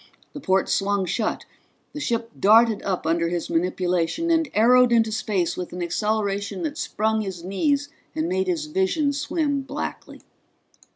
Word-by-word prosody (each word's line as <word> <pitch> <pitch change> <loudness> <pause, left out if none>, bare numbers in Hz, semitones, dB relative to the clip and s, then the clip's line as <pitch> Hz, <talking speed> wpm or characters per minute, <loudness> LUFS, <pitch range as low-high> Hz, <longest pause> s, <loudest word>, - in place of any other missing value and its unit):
The - - -7
ports 190 -7 +1
swung 200 -1 +1
shut. 210 +5 -2 0.5
The 300 - -5
ship 230 -4 -2
darted 220 +1 +5
up 185 -4 -2
under 165 +1 +1
his 175 -1 -3
manipulation 180 - 0
and 325 -3 +2
arrowed 245 +3 +5
into 225 -2 +3
space 205 -5 -1
with 180 -1 -6
an 180 0 -4
acceleration 205 - -1
that 300 -2 -3
sprung 220 +1 0
his 190 -4 -6
knees 280 - 0 0.3
and 160 +1 -1
made 190 +1 0
his 175 -4 -1
vision 190 - 0
swim 290 0 -1
blackly. 275 +2 -6
210 Hz, 155 wpm, -23 LUFS, 180-250 Hz, 0.5 s, darted